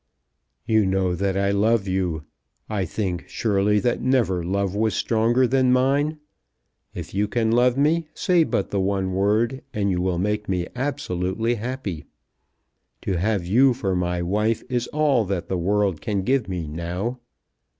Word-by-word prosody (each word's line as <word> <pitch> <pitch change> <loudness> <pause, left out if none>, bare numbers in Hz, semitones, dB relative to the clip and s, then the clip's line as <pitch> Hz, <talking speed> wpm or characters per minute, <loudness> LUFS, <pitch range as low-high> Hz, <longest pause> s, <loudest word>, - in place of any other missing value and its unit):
"You 110 -2 +3
know 95 -1 +1
that 95 +2 -1
I 100 0 +1
love 105 +1 +2
you. 90 -4 -1 0.4
I 100 -4 -1
think, 90 -1 -3
surely, 105 -1 +1
that 120 -1 0
never 120 -8 +1
love 100 +2 -1
was 110 0 0
stronger 120 +4 +2
than 130 0 +2
mine. 140 +4 +2 0.8
If - - -7
you 100 +2 +1
can 110 0 0
love 125 +2 +3
me 155 +3 +2
say 175 -2 +3
but 100 - -2
the 100 - 0
one 95 -1 0
word, 110 +7 +1
and 100 -2 +1
you 90 -1 0
will 90 -1 0
make 105 +3 -1
me 90 -2 0
absolutely 115 -6 -1
happy. 115 - -5 1.0
To 95 -3 -1
have 100 -1 0
you 125 +7 +4
for 95 -7 -1
my 90 -1 -1
wife 105 +5 0
is 125 -1 -1
all 145 -6 +2
that 95 -2 -3
the 95 - 0
world 100 -2 0
can 100 -3 -1
give 130 -1 +1
me 90 -4 -3
now. 90 +10 -4
105 Hz, 160 wpm, -23 LUFS, 95-120 Hz, 1.0 s, you